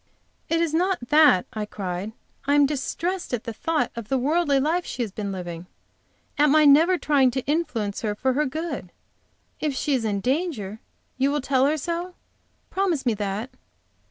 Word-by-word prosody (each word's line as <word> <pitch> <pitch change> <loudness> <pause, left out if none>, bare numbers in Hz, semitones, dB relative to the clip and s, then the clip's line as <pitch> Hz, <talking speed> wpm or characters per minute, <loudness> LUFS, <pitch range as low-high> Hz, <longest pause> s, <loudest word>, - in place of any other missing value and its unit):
"It 330 - +2
is 330 -2 0
not 350 -6 0
that," 295 -11 +6
I 215 -1 -3
cried. 195 +1 -5 0.3
"I 285 - +4
am 290 -1 +6
distressed 300 +4 -2
at 230 - -7
the 230 - -5
thought 305 +1 -1
of 230 -3 -6
the 270 - +2
worldly 290 +1 +2
life 325 +6 +1
she 250 - -3
has 215 - -5
been 205 0 -4
living 175 -2 -6 0.7
at 295 0 +5
my 305 +1 +5
never 320 +6 +6
trying 280 -5 +3
to 255 +1 -3
influence 280 -10 -1
her 210 -2 -1
for 260 +4 0
her 295 +3 +1
good. 280 - -5 0.7
If 295 -3 -1
she 290 - 0
is 255 -4 +1
in 205 -2 -1
danger, 250 - -2 0.4
you 270 +1 +3
will 295 +1 0
tell 265 0 +2
her 305 +2 +1
so? 345 +4 -4 0.6
Promise 365 -8 0
me 240 - +3
that." 205 +3 -3
275 Hz, 185 wpm, -24 LUFS, 220-315 Hz, 0.7 s, that